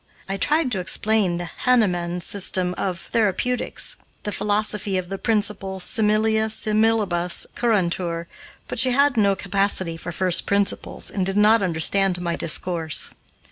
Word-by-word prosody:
I 195 Hz, -, -3 dB
tried 295 Hz, +6 st, +1 dB
to 195 Hz, -, -1 dB
explain 190 Hz, 0 st, +1 dB
the 175 Hz, -, -4 dB
Hahnemann 180 Hz, -6 st, 0 dB
system 185 Hz, -1 st, 0 dB
of 180 Hz, -3 st, -3 dB
therapeutics, 230 Hz, +3 st, -1 dB, 0.3 s
the 210 Hz, -, -4 dB
philosophy 210 Hz, -1 st, -1 dB
of 180 Hz, -1 st, -4 dB
the 195 Hz, 0 st, -5 dB
principle 205 Hz, -3 st, -1 dB
similia 220 Hz, +2 st, +2 dB
similibus 215 Hz, -5 st, +1 dB
curantur, 175 Hz, -6 st, -1 dB, 0.4 s
but -, -, -2 dB
she 255 Hz, -1 st, +4 dB
had 280 Hz, +1 st, +3 dB
no 200 Hz, -3 st, +2 dB
capacity 195 Hz, -4 st, 0 dB
for 170 Hz, -, -7 dB
first 180 Hz, +1 st, +1 dB
principles, 200 Hz, 0 st, -1 dB
and 195 Hz, -, -2 dB
did 195 Hz, +2 st, -1 dB
not 215 Hz, +2 st, +4 dB
understand 185 Hz, +1 st, +1 dB
my 170 Hz, -1 st, -2 dB
discourse. 165 Hz, -1 st, +1 dB
195 Hz, 140 wpm, -22 LUFS, 180-215 Hz, 0.4 s, she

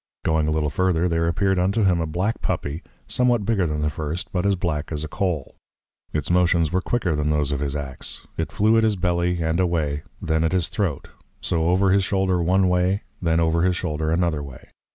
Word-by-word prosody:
Going 80 Hz, -1 st, +2 dB
a -, -, +1 dB
little 75 Hz, -2 st, 0 dB
further, 90 Hz, +1 st, +1 dB
there 85 Hz, -1 st, +1 dB
appeared 95 Hz, +2 st, +1 dB
unto 100 Hz, +5 st, +1 dB
him 90 Hz, -3 st, +3 dB
a 80 Hz, -, -1 dB
Black 95 Hz, +8 st, -2 dB
Puppy, 75 Hz, +4 st, -2 dB, 0.2 s
somewhat 120 Hz, -4 st, +1 dB
bigger 100 Hz, -6 st, +1 dB
than 75 Hz, -1 st, -2 dB
the 75 Hz, -, +1 dB
first, 80 Hz, +3 st, -4 dB
but 90 Hz, +1 st, 0 dB
as 100 Hz, -, +3 dB
Black 80 Hz, -5 st, -3 dB
as 75 Hz, -1 st, -3 dB
a -, -, -3 dB
Cole. 85 Hz, -4 st, -2 dB, 0.6 s
Its 75 Hz, +1 st, -2 dB
Motions 85 Hz, -3 st, +3 dB
were 95 Hz, -, +1 dB
quicker 95 Hz, -7 st, 0 dB
than 75 Hz, 0 st, 0 dB
those 75 Hz, -1 st, +1 dB
of 70 Hz, -, -1 dB
his 70 Hz, 0 st, -2 dB
Ax; 70 Hz, -3 st, -5 dB
it -, -, -3 dB
flew 110 Hz, +2 st, +3 dB
at -, -, +2 dB
his 110 Hz, -2 st, +2 dB
Belly, 90 Hz, -1 st, 0 dB
and 80 Hz, +2 st, 0 dB
away; 80 Hz, -5 st, 0 dB, 0.2 s
then 80 Hz, 0 st, 0 dB
at 80 Hz, -, +1 dB
his 90 Hz, -3 st, +1 dB
Throat; 90 Hz, -9 st, -2 dB, 0.3 s
so, 80 Hz, -1 st, 0 dB
over 95 Hz, +2 st, +3 dB
his 100 Hz, 0 st, +3 dB
Shoulder 95 Hz, -2 st, +1 dB
one 95 Hz, +3 st, +3 dB
way, 90 Hz, 0 st, +2 dB
and 100 Hz, -, -3 dB, 0.2 s
then 85 Hz, -2 st, +2 dB
over 85 Hz, 0 st, +2 dB
his 90 Hz, 0 st, +2 dB
Shoulder 80 Hz, -3 st, -2 dB
another 85 Hz, -2 st, +1 dB
way. 70 Hz, -3 st, -11 dB
85 Hz, 220 wpm, -23 LUFS, 75-95 Hz, 0.6 s, him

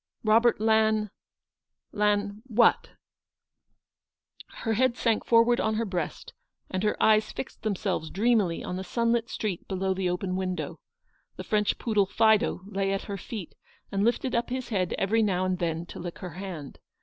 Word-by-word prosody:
Robert 230 Hz, +2 st, +4 dB
Lan 220 Hz, -1 st, +2 dB, 0.4 s
— -, -, -61 dB
Lan 205 Hz, 0 st, +1 dB
— -, -, -23 dB
what? 235 Hz, -1 st, +3 dB, 0.9 s
" -, -, -24 dB, 0.2 s
Her 225 Hz, -, +1 dB
head 250 Hz, +2 st, +2 dB
sank 225 Hz, -2 st, +1 dB
forward 235 Hz, +1 st, +5 dB
on 220 Hz, 0 st, 0 dB
her 230 Hz, +1 st, 0 dB
breast, 180 Hz, -5 st, -4 dB, 0.4 s
and 185 Hz, -, -1 dB
her 210 Hz, 0 st, 0 dB
eyes 215 Hz, 0 st, +4 dB
fixed -, -, -7 dB
themselves 195 Hz, -6 st, -2 dB
dreamily 205 Hz, -5 st, +1 dB
on 180 Hz, -, -4 dB
the 190 Hz, -, -4 dB
sunlit 235 Hz, +2 st, 0 dB
street 200 Hz, -6 st, -4 dB
below 190 Hz, 0 st, -1 dB
the 185 Hz, -1 st, -1 dB
open 185 Hz, +1 st, -2 dB
window. 185 Hz, -1 st, -3 dB, 0.6 s
The -, -, -7 dB
French 210 Hz, -1 st, +1 dB
poodle, 210 Hz, -4 st, +1 dB
Fido, 220 Hz, -2 st, +3 dB
lay 195 Hz, -1 st, -1 dB
at 195 Hz, -, -1 dB
her 200 Hz, -1 st, -5 dB
feet, 195 Hz, -1 st, -7 dB, 0.4 s
and 195 Hz, 0 st, 0 dB
lifted 240 Hz, +3 st, +1 dB
up 235 Hz, +1 st, 0 dB
his 255 Hz, 0 st, -4 dB
head 185 Hz, -6 st, 0 dB
every 220 Hz, +4 st, +2 dB
now 185 Hz, -4 st, +1 dB
and 185 Hz, -1 st, -1 dB
then 165 Hz, -1 st, -2 dB
to -, -, -10 dB
lick 175 Hz, 0 st, -6 dB
her 180 Hz, -3 st, -7 dB
hand. 175 Hz, -6 st, -7 dB
205 Hz, 175 wpm, -27 LUFS, 185-225 Hz, 0.9 s, forward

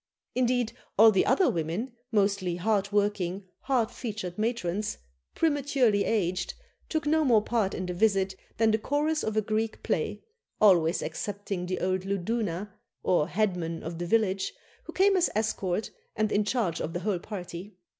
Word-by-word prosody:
Indeed, 245 Hz, -2 st, +1 dB, 0.2 s
all 220 Hz, +2 st, +9 dB
the 190 Hz, -, +2 dB
other 380 Hz, -, +4 dB
women, 180 Hz, -, -1 dB, 0.2 s
mostly 200 Hz, -4 st, +1 dB
hard 200 Hz, +2 st, 0 dB
working, 200 Hz, -2 st, 0 dB
hard 250 Hz, -5 st, 0 dB
featured 205 Hz, -7 st, -5 dB
matrons, 210 Hz, -3 st, -1 dB, 0.4 s
prematurely 275 Hz, -9 st, +2 dB
aged, 180 Hz, -4 st, 0 dB, 0.3 s
took 315 Hz, -2 st, -1 dB
no 315 Hz, +1 st, +3 dB
more 230 Hz, -7 st, +4 dB
part 215 Hz, -5 st, 0 dB
in 185 Hz, -, -3 dB
the 180 Hz, -, -3 dB
visit 195 Hz, -1 st, +2 dB, 0.2 s
than 225 Hz, 0 st, +4 dB
the 220 Hz, -, +2 dB
chorus 300 Hz, +6 st, 0 dB
of 220 Hz, 0 st, -2 dB
a 215 Hz, -, +3 dB
Greek 220 Hz, +1 st, -2 dB
play, -, -, -1 dB, 0.4 s
always 175 Hz, -5 st, +4 dB
excepting 195 Hz, +2 st, -4 dB
the 185 Hz, -, -2 dB
old 185 Hz, 0 st, 0 dB
luduna, 200 Hz, 0 st, -2 dB, 0.3 s
or 165 Hz, -4 st, +2 dB
headman 180 Hz, -5 st, -1 dB
of 165 Hz, +1 st, -5 dB
the 175 Hz, -, -3 dB
village, 195 Hz, -2 st, +1 dB, 0.3 s
who -, -, -7 dB
came 390 Hz, +1 st, +4 dB
as 360 Hz, -2 st, +3 dB
escort, 215 Hz, -2 st, -1 dB, 0.2 s
and 215 Hz, -1 st, 0 dB
in 205 Hz, 0 st, +2 dB
charge 205 Hz, -8 st, 0 dB
of 160 Hz, -, -3 dB
the 175 Hz, -, -3 dB
whole 195 Hz, -2 st, 0 dB
party. 185 Hz, 0 st, -7 dB
205 Hz, 160 wpm, -28 LUFS, 180-225 Hz, 0.4 s, all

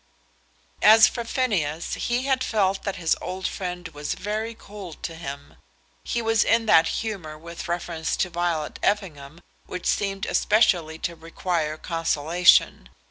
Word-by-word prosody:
As 220 Hz, +1 st, +8 dB
for 235 Hz, -, -4 dB
Phineas, 185 Hz, -, -1 dB
he 240 Hz, +1 st, -1 dB
had 265 Hz, -1 st, +1 dB
felt 195 Hz, -3 st, +1 dB
that 195 Hz, -, -3 dB
his 170 Hz, -4 st, +1 dB
old 185 Hz, +1 st, -3 dB
friend 180 Hz, -2 st, -5 dB
was 145 Hz, -1 st, -4 dB
very 215 Hz, +3 st, -3 dB
cold 200 Hz, -6 st, -11 dB
to 165 Hz, -, -4 dB
him. 140 Hz, -3 st, -8 dB, 0.5 s
He 235 Hz, -1 st, -2 dB
was 225 Hz, -1 st, +3 dB
in 230 Hz, 0 st, +2 dB
that 165 Hz, -6 st, +5 dB
humour 190 Hz, -9 st, -4 dB
with 170 Hz, +2 st, -8 dB
reference 170 Hz, -1 st, -2 dB
to 185 Hz, -, -1 dB
Violet 170 Hz, -3 st, -2 dB
Effingham 165 Hz, -6 st, -2 dB, 0.3 s
which 180 Hz, -, -6 dB
seemed 195 Hz, -1 st, 0 dB
especially 175 Hz, -7 st, +2 dB
to 170 Hz, +1 st, -4 dB
require 165 Hz, -1 st, -3 dB
consolation. 165 Hz, -, +2 dB
180 Hz, 140 wpm, -24 LUFS, 160-210 Hz, 0.5 s, As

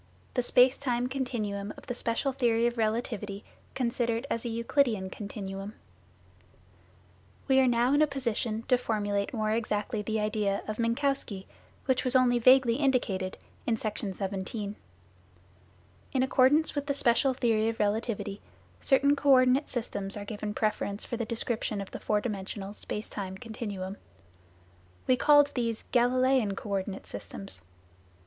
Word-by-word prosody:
THE 250 Hz, -, +1 dB
SPACE 250 Hz, +1 st, +4 dB
TIME 245 Hz, -3 st, 0 dB
CONTINUUM 215 Hz, -6 st, -3 dB
OF -, -, -13 dB
THE 245 Hz, -, -3 dB
SPEICAL 240 Hz, +3 st, -1 dB
THEORY 235 Hz, -3 st, +2 dB
OF 240 Hz, 0 st, +1 dB
RELATIVITY 215 Hz, -2 st, -2 dB, 0.3 s
CONSIDERED 235 Hz, -1 st, 0 dB
AS 230 Hz, -, -1 dB
A -, -, -1 dB
EUCLIDEAN 230 Hz, -4 st, +1 dB
CONTINUUM 200 Hz, 0 st, -6 dB, 1.7 s
We 265 Hz, -1 st, +5 dB
are 260 Hz, -, +5 dB
now 245 Hz, +2 st, +3 dB
in 290 Hz, -, +4 dB
a 305 Hz, -, +5 dB
position 235 Hz, -5 st, -2 dB
to 250 Hz, 0 st, +2 dB
formulate 205 Hz, 0 st, -1 dB
more 215 Hz, -4 st, -1 dB
exactly 215 Hz, 0 st, -1 dB
the 220 Hz, +1 st, -1 dB
idea 210 Hz, -2 st, 0 dB
of 215 Hz, +1 st, -4 dB
Minkowski, 230 Hz, -4 st, 0 dB, 0.4 s
which 260 Hz, -1 st, +1 dB
was 255 Hz, 0 st, +3 dB
only 245 Hz, -1 st, +4 dB
vaguely 255 Hz, -1 st, +6 dB
indicated 235 Hz, -10 st, 0 dB, 0.3 s
in 230 Hz, -2 st, +2 dB
Section 210 Hz, -3 st, -3 dB
17. 200 Hz, +2 st, -4 dB, 1.4 s
In 260 Hz, -1 st, +2 dB
accordance 265 Hz, +4 st, +4 dB
with 285 Hz, -1 st, -3 dB
the 280 Hz, -, 0 dB
special 255 Hz, +1 st, +3 dB
theory 225 Hz, -3 st, +2 dB
of 225 Hz, -, -5 dB
relativity, 210 Hz, -1 st, -1 dB, 0.4 s
certain 280 Hz, +1 st, +4 dB
co 285 Hz, 0 st, 0 dB
ordinate 260 Hz, +1 st, +5 dB
systems 205 Hz, -5 st, -3 dB
are 205 Hz, -, -6 dB
given 210 Hz, 0 st, -5 dB
preference 210 Hz, -1 st, -1 dB
for -, -, -4 dB
the 230 Hz, -1 st, -2 dB
description 225 Hz, -1 st, -1 dB
of 195 Hz, -, -6 dB
the -, -, -6 dB
four 210 Hz, -1 st, 0 dB
dimensional, 200 Hz, -2 st, -5 dB
space 210 Hz, 0 st, -5 dB
time 190 Hz, -2 st, -5 dB
continuum. 205 Hz, -4 st, -6 dB, 1.1 s
We 255 Hz, -, +4 dB
called 290 Hz, +1 st, +5 dB
these 230 Hz, -3 st, -1 dB
" -, -, -32 dB
Galileian 250 Hz, -3 st, +3 dB
co 210 Hz, -, -6 dB
ordinate 195 Hz, 0 st, -3 dB
systems." 100 Hz, -2 st, -7 dB
230 Hz, 150 wpm, -29 LUFS, 205-255 Hz, 1.7 s, vaguely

